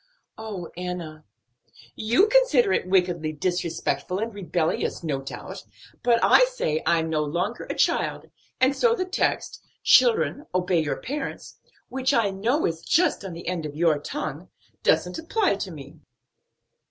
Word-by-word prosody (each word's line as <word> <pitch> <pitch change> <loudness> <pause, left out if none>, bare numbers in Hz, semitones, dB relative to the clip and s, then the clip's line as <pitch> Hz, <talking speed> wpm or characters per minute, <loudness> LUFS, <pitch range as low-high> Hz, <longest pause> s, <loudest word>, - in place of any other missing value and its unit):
"Oh, 205 -6 -6
Enna!" 175 -3 -6 0.7
"You 235 - +3
consider - - +4
it - - 0
wickedly 175 -4 +1
disrespectful 170 0 -2
and 225 +2 -3
rebellious 175 -4 -2
no 140 -4 -2
doubt, 135 - -8 0.4
but 235 -1 +3
I - - +7
say 330 - -2
I'm 165 -1 +2
no 155 -1 0
longer 170 +5 -2
a - - -5
child, - - 0 0.3
and 260 +2 +3
so 465 - +3
the 370 - -2
text, 370 - -1 0.2
'Children 440 -10 +4
obey 180 -1 +2
your 150 - -2
parents' 280 +2 -6 0.3
which 265 +1 0
I 220 -4 +2
know 230 +11 0
is 165 -1 -2
just 330 - +2
on 190 -3 -6
the 170 - -9
end 180 -2 -2
of 145 - -9
your 160 -2 +2
tongue 285 - -5 0.3
doesn't - - +1
apply 365 - +1
to 195 - -4
me." 150 0 -11
185 Hz, 150 wpm, -25 LUFS, -, 0.7 s, I